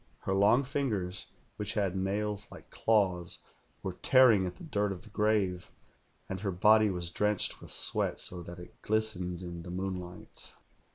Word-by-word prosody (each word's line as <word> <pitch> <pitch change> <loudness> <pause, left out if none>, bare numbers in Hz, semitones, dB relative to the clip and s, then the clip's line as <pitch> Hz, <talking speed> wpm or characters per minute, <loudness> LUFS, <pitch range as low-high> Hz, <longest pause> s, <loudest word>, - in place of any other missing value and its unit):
Her 95 - -1
long 105 +7 +5
fingers, 110 -10 -2 0.3
which 105 +2 -4
had 100 -3 0
nails 100 +2 -1
like - - -13
claws, 95 -6 +1 0.5
were 95 -1 -3
tearing 115 -8 +6
at 90 - -6
the - - -12
dirt 105 -10 0
of 90 -1 -6
the 105 - -15
grave, 105 -4 +1 0.6
and 95 - -4
her 100 +1 -2
body 105 +4 +5
was 90 -3 -3
drenched 105 +2 0
with - - -10
sweat, - - 0
so 90 -1 -4
that 85 +1 -9
it 90 0 -13
glistened 95 -5 -1
in 85 -1 -6
the 85 - -9
moonlight. 90 -1 -5
95 Hz, 165 wpm, -31 LUFS, 90-105 Hz, 0.6 s, tearing